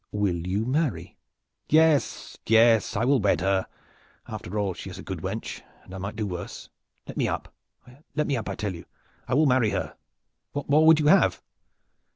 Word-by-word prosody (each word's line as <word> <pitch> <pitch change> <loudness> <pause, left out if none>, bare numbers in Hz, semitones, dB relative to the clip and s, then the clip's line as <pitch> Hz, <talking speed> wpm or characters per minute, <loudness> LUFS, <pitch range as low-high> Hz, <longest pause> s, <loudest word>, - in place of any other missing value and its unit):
"Will 90 -5 -1
you 100 +4 -1
marry?" 125 - -1 0.5
"Yes, 155 -2 +2
yes, 115 0 +4
I 110 +3 +1
will 135 +1 +3
wed 100 -3 +2
her! 95 0 +1 0.6
After 100 +5 -6
all 100 -3 0
she - - -8
is - - -9
a - - -9
good - - -5
wench - - -5 0.2
and 95 - -14
I 95 - -6
might 100 +4 -5
do 110 -1 -2
worse. 90 -3 -7 0.4
Let - - -9
me - - +1
up! - - -4 0.3
I 140 -2 -4
tell 105 -3 -3
you 85 - -10 0.4
I 125 - 0
will 155 +3 +4
marry 130 -5 +3
her! - - -3 0.6
What 145 -1 -4
more 155 +2 +4
would 160 -1 +7
you 150 - 0
have?" 190 +6 +4
115 Hz, 180 wpm, -26 LUFS, 100-145 Hz, 0.6 s, would